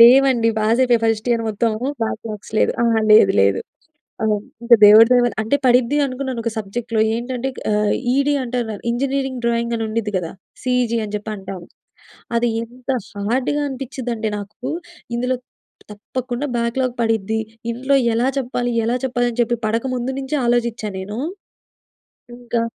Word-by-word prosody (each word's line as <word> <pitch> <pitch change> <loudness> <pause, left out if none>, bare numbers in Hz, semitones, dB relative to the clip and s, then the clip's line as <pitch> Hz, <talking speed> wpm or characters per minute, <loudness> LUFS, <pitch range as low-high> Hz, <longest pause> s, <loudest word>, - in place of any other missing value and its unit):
లేవండి. 245 -1 +7
పాస్ 225 +3 +2
అయిపోయా 240 -2 +3
first 225 +1 0
year 230 -1 +2
మొత్తం 225 +2 0 0.3
బ్యాక్‌లాగ్స్ 220 -1 -5
లేదు. - - +3
ఆ! - - +3 0.3
లేదు 210 -2 +7
లేదు. 100 0 +3 0.6
ఆ! - - +1 0.4
ఇంకా 235 0 +7
దేవుడి 215 +2 +9
దయ 245 - +6
వాళ్ల 240 - 0
అంటే 230 +6 +1
పడిద్ది, 250 +3 +4
అనుకున్నాను 255 -2 -4
ఒక 230 - 0
సబ్జెక్ట్‌లో 220 +2 -2
ఏంటంటే 245 +2 -3 0.2
ఆహ్, 210 0 +2 0.2
ఈడీ 280 +1 +2
అంటారు. 240 -3 -2 0.2
ఇంజనీరింగ్ 265 0 -1
డ్రాయింగ్ 235 0 0
అని 225 - -2
ఉండద్ది 215 -1 -2
కదా! 165 -2 -5 0.3
సిఇజీ 250 -2 +1
అని 210 - -7
చెప్పి 210 +1 -6
అంటాము. 190 -3 -8 0.7
అది 240 +1 +2 0.2
ఎంత 250 +3 -8 0.4
హార్డ్‌గా 265 +5 0
అనిపించిందంటే 245 -4 -4
నాకు, 210 +6 -7 0.5
ఇందులో 250 +1 0 0.6
తప్పకుండా, 250 +5 -4
బ్యాక్‌లాగ్ 240 +2 -1
పడిద్ది. 220 -1 0 0.3
ఇంట్లో 265 +4 +1 0.2
ఎలా 240 +3 +2
చెప్పాలి? 245 -1 -2
ఎలా 240 +2 +1
చెప్పాలి? 245 -1 0
అని 240 - -2
చెప్పి 240 0 -1
పడక 230 +4 0
ముందు, 245 +2 -2
నుంచే 270 +3 -2
ఆలోచించాను 235 -4 0
నేను. 210 +4 -6 1.2
ఇంకా 235 -1 -1
235 Hz, 150 wpm, -20 LUFS, 220-255 Hz, 1.2 s, దేవుడి